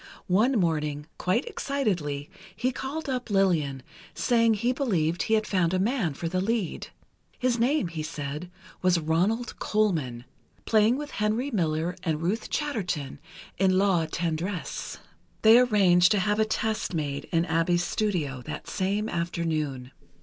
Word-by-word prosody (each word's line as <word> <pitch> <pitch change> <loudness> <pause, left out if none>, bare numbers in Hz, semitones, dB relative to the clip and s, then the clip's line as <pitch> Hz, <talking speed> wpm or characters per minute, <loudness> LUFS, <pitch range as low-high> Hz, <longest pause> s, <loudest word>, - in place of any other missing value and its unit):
One 215 +9 +3
morning, 150 -4 0
quite 215 +9 +1
excitedly, 175 - -2 0.3
he 255 - 0
called 285 +5 -5
up 250 -3 -3
Lillian, 165 -10 +1 0.3
saying 230 -2 +3
he 235 +4 +1
believed 180 - 0
he 220 - +2
had 215 0 +1
found 185 -3 +1
a - - +1
man 200 - 0
for 165 - -4
the 185 +2 -1
lead. 215 -3 -1 0.5
His 250 -2 +1
name, 255 - +2
he 165 -2 -5
said, 150 +2 -5 0.3
was 185 -1 +3
Ronald 180 +10 0
Colman, 155 - 0 0.4
playing 220 +3 +4
with 295 0 -6
Henry 220 +6 -1
Miller 165 -3 0
and 160 -4 -1
Ruth 200 +7 -1
Chatterton, 195 - -2 0.4
in 185 -1 +4
"La 190 -5 +3
Tendresse." 170 +3 -3 0.5
They 225 +2 +8
arranged 195 -7 +5
to 205 - +2
have 210 +2 +1
a 220 - +4
test 215 -3 -1
made 145 -2 -2
in 165 -1 0
Abbe's 170 +1 +1
studio, 170 -12 -1
that 150 -1 -6
same 200 +3 -1
afternoon. 155 - -2
185 Hz, 145 wpm, -27 LUFS, 160-220 Hz, 0.5 s, They